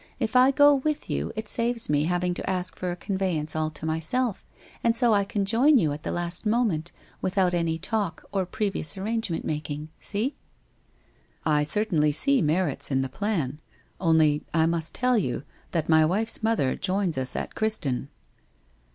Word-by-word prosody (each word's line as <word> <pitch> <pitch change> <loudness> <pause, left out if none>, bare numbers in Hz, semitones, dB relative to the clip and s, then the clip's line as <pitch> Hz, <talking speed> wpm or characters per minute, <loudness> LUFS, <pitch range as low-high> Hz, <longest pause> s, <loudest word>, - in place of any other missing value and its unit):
If 230 -2 -2
I 255 +1 +7
go 290 +1 +6
with 290 +2 -1
you - - -2
it 220 0 -4
saves 235 +1 -1
me 150 0 +2
having 180 +1 0
to - - -5
ask 185 -2 -2
for 180 - -3
a 175 - -2
conveyance 180 -5 -2
all 155 0 0
to 155 0 -8
myself, 185 +9 -1 0.4
and 230 -1 +3
so 235 -1 +4
I 200 -1 +3
can 200 0 -2
join 255 +8 +4
you 160 -10 +2
at 150 - -7
the - - -4
last 175 0 -2
moment, 210 -8 0 0.3
without 185 -1 +1
any 165 -2 0
talk 200 0 -3
or 190 -2 -1
previous 190 -6 -2
ar 190 - -5
rangement 220 -6 -1
making. 150 0 -4
See? 220 +8 -2 0.4
' - - -38
' - - -36 0.2
I 150 -2 +3
certainly 155 -2 +2
see 265 - +3
merits 155 -1 0
in 135 -1 +1
the 135 - -4
plan. 160 -10 -2 0.4
Only 160 -4 +3
— - - -32
I 160 -1 +4
must 165 -1 -2
tell 250 -2 +2
you, 130 -6 -2 0.3
that 165 -3 -1
my 160 -1 +5
wife's 210 +8 0
mother 220 -12 +1
joins 190 -3 0
us 130 -1 -1
at - - -3
Criston.' 145 - 0
180 Hz, 185 wpm, -26 LUFS, 155-220 Hz, 0.4 s, I